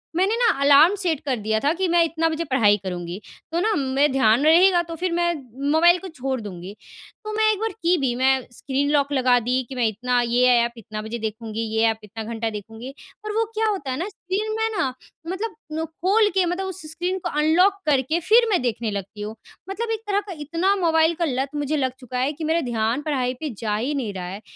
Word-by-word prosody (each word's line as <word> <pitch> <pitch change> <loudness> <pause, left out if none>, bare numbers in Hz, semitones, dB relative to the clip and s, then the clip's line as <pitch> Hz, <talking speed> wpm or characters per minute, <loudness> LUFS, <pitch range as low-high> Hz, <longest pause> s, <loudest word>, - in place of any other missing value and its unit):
मैंने 385 +5 +2
ना - - +2 0.2
alarm 290 +6 +7
set 350 -7 -1
कर 270 -3 0
दिया 220 +1 0
था 290 - +3
कि 375 - +1
मैं 340 0 +4
इतना 325 0 0
बजे 320 +1 -2
पढ़ाई 210 -5 +4
करुँगी। 180 -1 -5 0.3
तो 335 - 0
ना 435 +3 +1
मैं 275 +1 +1
ध्यान 255 0 +3
रहेगा 350 +3 +6
तो 335 0 -7
फिर 360 +2 -2
मैं 345 0 +1 0.4
मोबाइल 345 +3 +5
को 380 - -8
छोड़ 265 -5 -4
दूँगी। 190 -2 -8 0.5
तो 430 0 -5
मैं 435 0 +3
एक 415 - -2
बार 450 - -1
की 350 +2 +3
भी। 265 -5 0
मैं 265 +1 +2
स्क्रीन 275 +3 -2
लॉक 285 -1 +2
लगा 255 -2 +4
दी, 250 +2 0
कि 265 - -7
मैं 245 -2 +1
इतना 245 +4 0
ये 240 +1 +2 0.2
ऐप 235 0 0
इतना 215 -1 -7
बजे 220 +2 -5
देखूँगी, 220 0 -4
ये 220 - +2
ऐप 220 - -2
इतना 220 +2 -7
घंटा 225 0 -3
देखूँगी। 225 +5 -8 0.3
और 425 - -3
वो 450 - +3
क्या 440 0 0
होता 315 -11 -3
है 255 - -2
ना 350 - -3
स्क्रीन 405 +3 -3
में 440 -12 0 0.4
मतलब 420 +4 -4 0.2
नु 320 - -1
खोल 385 +7 +2
के 380 -2 +3
मतलब 355 +2 -2
उस 380 0 -5
स्क्रीन 355 +3 -2
को 350 - -4
अनलॉक 340 +6 +4
करके 295 +2 +1
फिर 450 +7 +4
मैं 370 - +2
देखने 235 -2 -2
लगती 200 +1 -6
हूँ। 215 +1 -5 0.3
मतलब 450 +4 -3
एक 440 - -3
तरह 405 -1 +2
का 375 - -5
इतना 335 +7 0
मोबाइल 325 -3 +3
का - - +3
लत 265 -2 -1
मुझे 295 +1 -1
लग 260 -2 0
चुका 250 -1 -6
है 265 +3 +1
कि 315 +2 -8
मेरा 325 +2 +1
ध्यान 235 0 -1
पढ़ाई 260 -5 -1
पे 310 - -3
जा 210 -2 -1
ही 250 +8 -1
नहीं 235 -7 -3
रहा 185 -2 -5
है। 190 +3 -7
285 Hz, 230 wpm, -23 LUFS, 235-350 Hz, 0.5 s, alarm